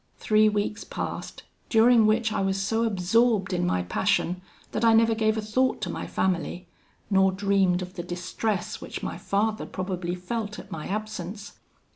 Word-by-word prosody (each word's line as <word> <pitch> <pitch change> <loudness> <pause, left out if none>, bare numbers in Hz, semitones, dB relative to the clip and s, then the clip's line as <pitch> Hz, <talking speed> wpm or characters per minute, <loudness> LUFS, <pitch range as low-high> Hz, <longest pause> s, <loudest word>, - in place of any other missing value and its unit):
Three 215 0 +4
weeks 210 0 -2
passed, - - -6 0.3
during 225 -1 +5
which 220 0 +2
I - - 0
was 195 0 0
so 225 +4 0
absorbed 205 0 +2
in 175 0 0
my 90 - +1
passion, 180 - 0 0.3
that - - -2
I 225 -1 +6
never 225 0 +4
gave 220 0 +1
a 220 - -2
thought 255 +5 +1
to - - -2
my - - -5
family, 180 -1 -1 0.4
nor 190 -1 +4
dreamed 190 -2 +2
of 180 0 -9
the 180 - -5
distress 180 +4 -3
which - - -7
my - - -4
father 215 +2 -1
probably 185 -2 -3
felt 210 +3 -4
at - - -11
my 155 -2 -5
absence. 210 -1 -5
205 Hz, 170 wpm, -26 LUFS, 185-220 Hz, 0.4 s, I